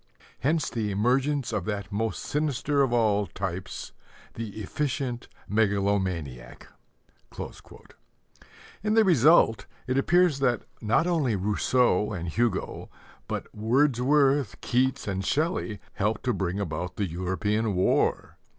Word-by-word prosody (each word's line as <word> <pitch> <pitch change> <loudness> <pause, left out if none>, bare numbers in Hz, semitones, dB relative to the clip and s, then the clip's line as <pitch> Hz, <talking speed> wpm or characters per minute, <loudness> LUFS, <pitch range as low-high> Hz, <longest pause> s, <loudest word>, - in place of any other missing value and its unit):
Hence 155 +4 +1
the 110 -3 -2
emergence 125 +5 +1
of 100 -5 -1
that 100 -2 -4
most 110 0 -2
sinister 145 -1 0
of 135 -3 +2
all 105 -4 +2
types, 95 -1 -5 0.4
the 110 -2 -6
efficient 130 +1 -3 0.2
megalomaniac." 95 - -1 2.1
In 215 +1 0
the 225 - +6
result 140 - +4 0.2
it 130 +1 +1
appears 175 -1 +3
that 125 -3 +1 0.2
not 115 +9 +2
only 155 -10 +1
Rousseau 105 +1 +1
and 85 -3 -4
Hugo, 110 +3 -1 0.4
but - - -5
Wordsworth, 135 +2 +2
Keats, 130 0 0
and 95 -1 -2
Shelley, 145 - -1
helped 105 +1 -1
to 125 -1 +1
bring 95 -1 -2
about 90 -1 -4
the 100 - -1
European 95 +5 -1
War! 90 - +1
115 Hz, 115 wpm, -27 LUFS, 100-135 Hz, 2.1 s, the